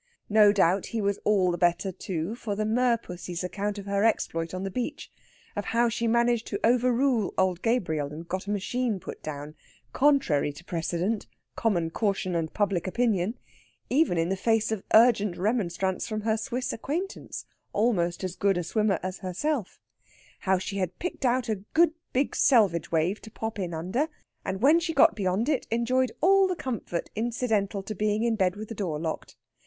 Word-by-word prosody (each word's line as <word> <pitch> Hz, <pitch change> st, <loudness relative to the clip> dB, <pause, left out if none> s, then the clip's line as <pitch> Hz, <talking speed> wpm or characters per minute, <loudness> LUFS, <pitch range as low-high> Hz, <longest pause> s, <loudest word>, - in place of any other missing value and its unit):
No 210 Hz, -1 st, +6 dB
doubt 190 Hz, -1 st, +2 dB
he -, -, 0 dB
was 200 Hz, -1 st, 0 dB
all 190 Hz, -4 st, +3 dB
the 175 Hz, -, -3 dB
better, 175 Hz, +2 st, +2 dB
too, 175 Hz, +1 st, -4 dB
for 225 Hz, -3 st, -4 dB
the 215 Hz, +1 st, -1 dB
merpussy's 215 Hz, -7 st, -1 dB
account 205 Hz, +3 st, -3 dB
of 200 Hz, -, -7 dB
her 200 Hz, 0 st, 0 dB
exploit 165 Hz, -7 st, 0 dB
on 185 Hz, +1 st, -4 dB
the 195 Hz, -, -3 dB
beach; 245 Hz, +4 st, -4 dB, 0.4 s
of 205 Hz, -, -3 dB
how 235 Hz, +1 st, +2 dB
she 230 Hz, +1 st, -1 dB
managed 235 Hz, 0 st, +2 dB
to 200 Hz, -, -3 dB
overrule 245 Hz, -1 st, +2 dB
old 185 Hz, -1 st, +1 dB
Gabriel 160 Hz, -, 0 dB
and 165 Hz, +3 st, -8 dB
get 185 Hz, +2 st, -4 dB
a -, -, -4 dB
machine 210 Hz, +2 st, -1 dB
put -, -, -8 dB
down, 150 Hz, 0 st, -6 dB, 0.4 s
contrary 270 Hz, -, +3 dB
to 170 Hz, +4 st, -13 dB
precedent, 175 Hz, +5 st, -2 dB, 0.3 s
common 175 Hz, -8 st, 0 dB
caution, 195 Hz, -2 st, -1 dB
and 165 Hz, -2 st, -1 dB
public 200 Hz, -4 st, 0 dB
opinion 220 Hz, 0 st, 0 dB, 0.5 s
even 275 Hz, -, +3 dB
in 165 Hz, +1 st, +1 dB
the 195 Hz, -, +1 dB
face 225 Hz, +2 st, +1 dB
of 220 Hz, -3 st, -1 dB
urgent 215 Hz, -5 st, +5 dB
remonstrance 190 Hz, -2 st, -1 dB
from 215 Hz, -1 st, -3 dB
her 220 Hz, +1 st, +1 dB
Swiss 250 Hz, +3 st, -3 dB
acquaintance, 335 Hz, -, -4 dB, 0.3 s
almost 190 Hz, -6 st, +1 dB
as 185 Hz, -1 st, -3 dB
good 195 Hz, -2 st, +2 dB
a 175 Hz, -, -1 dB
swimmer 205 Hz, 0 st, +1 dB
as 185 Hz, 0 st, -4 dB
herself; 210 Hz, -, -2 dB, 0.6 s
how 190 Hz, 0 st, +2 dB
she 195 Hz, +2 st, -4 dB
had 185 Hz, -2 st, -2 dB
picked 355 Hz, -6 st, -4 dB
out 250 Hz, 0 st, +1 dB
a 220 Hz, -2 st, 0 dB, 0.2 s
good 330 Hz, 0 st, +5 dB, 0.2 s
big 265 Hz, +2 st, 0 dB
selvage 205 Hz, -10 st, +3 dB
wave 170 Hz, +5 st, +1 dB
to 220 Hz, -, -11 dB
pop 220 Hz, 0 st, -5 dB
in 180 Hz, -3 st, -2 dB
under, 185 Hz, -, -1 dB, 0.4 s
and 190 Hz, +3 st, -4 dB
when 305 Hz, +5 st, +6 dB
she 330 Hz, -1 st, -3 dB
got 330 Hz, -, +6 dB
beyond 195 Hz, +2 st, 0 dB
it 295 Hz, -4 st, 0 dB
enjoyed 240 Hz, +2 st, +1 dB
all 390 Hz, +3 st, +5 dB
the 365 Hz, -, -1 dB
comfort 230 Hz, -, -4 dB
incidental 220 Hz, -3 st, -1 dB
to 215 Hz, -, -5 dB
being 210 Hz, +2 st, 0 dB
in 235 Hz, -1 st, +2 dB
bed 185 Hz, -3 st, +1 dB
with 215 Hz, +1 st, -7 dB
the 225 Hz, -, -6 dB
door 175 Hz, -8 st, -3 dB
locked. 160 Hz, 0 st, -4 dB
205 Hz, 185 wpm, -27 LUFS, 180-235 Hz, 0.6 s, No